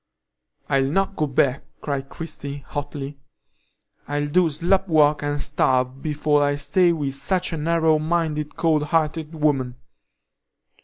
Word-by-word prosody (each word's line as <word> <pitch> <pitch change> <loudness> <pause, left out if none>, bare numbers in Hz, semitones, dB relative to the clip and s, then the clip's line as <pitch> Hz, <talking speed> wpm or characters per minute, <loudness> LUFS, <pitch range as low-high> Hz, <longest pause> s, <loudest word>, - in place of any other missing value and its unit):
"I'll 135 -1 +2
not 195 +5 0
go 155 - 0
back!" 135 -1 +1 0.2
cried 140 -2 -3
Christie, 145 -4 -7
hotly. 145 -1 -5 0.9
"I'll 145 0 -1
do 175 +2 +3
slop 175 +6 +1
work 150 -3 +4
and 145 0 -2
starve, 130 -1 0
before 150 -1 +1
I'll 145 0 +1
stay 175 +4 +3
with 145 -5 -2
such 180 +6 -1
a - - -2
narrow 160 0 +2
minded, 155 -2 -1
cold 160 -3 +2
hearted 160 0 -1
woman. 135 -5 +1
150 Hz, 135 wpm, -23 LUFS, 140-165 Hz, 0.9 s, work